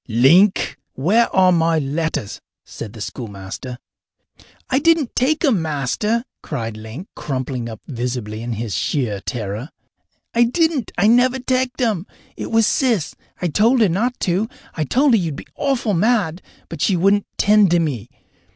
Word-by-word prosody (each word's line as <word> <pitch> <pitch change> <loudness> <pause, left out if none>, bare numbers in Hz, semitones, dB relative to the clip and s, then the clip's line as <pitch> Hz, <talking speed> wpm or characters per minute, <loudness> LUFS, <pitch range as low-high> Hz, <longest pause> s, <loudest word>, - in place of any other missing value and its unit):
"Link, 145 - +4
where 200 - +2
are 185 -1 +4
my 165 -1 +2
letters?" 150 -6 -2 0.2
said 105 - -8
the 110 - -10
schoolmaster. 105 +2 -7 0.9
"I 265 - +2
didn't 325 -4 +2
take 295 +6 +2
'em, 230 - +3
Master!" 160 - -1 0.2
cried 115 -7 -4
Link, 110 - -8
crumpling 130 -3 -3
up 110 -2 -9
visibly 120 -4 -4
in 120 0 -3
his 110 -1 -4
sheer 105 - -1
terror. 110 +5 -4 0.6
"I 235 +1 +4
didn't. 305 -1 0
I 195 - +3
never 245 +3 +4
teched 255 0 -1
'em! 215 -7 0 0.3
It - - -5
was 225 -1 +3
Sis. 230 - +1 0.3
I - - +2
told 225 - +3
her 210 - +5
not 235 +9 -1
to 195 +4 0 0.2
I 155 - -2
told 265 - +3
her - - +6
you'd 165 -7 -2
be - - -9
awful 270 -7 0
mad, 190 -3 +1 0.3
but 165 -3 -7
she 190 - +2
wouldn't 200 +3 +2
tend 210 -1 +5
to 175 0 +3
me. 145 -10 -2
175 Hz, 160 wpm, -20 LUFS, -, 0.9 s, her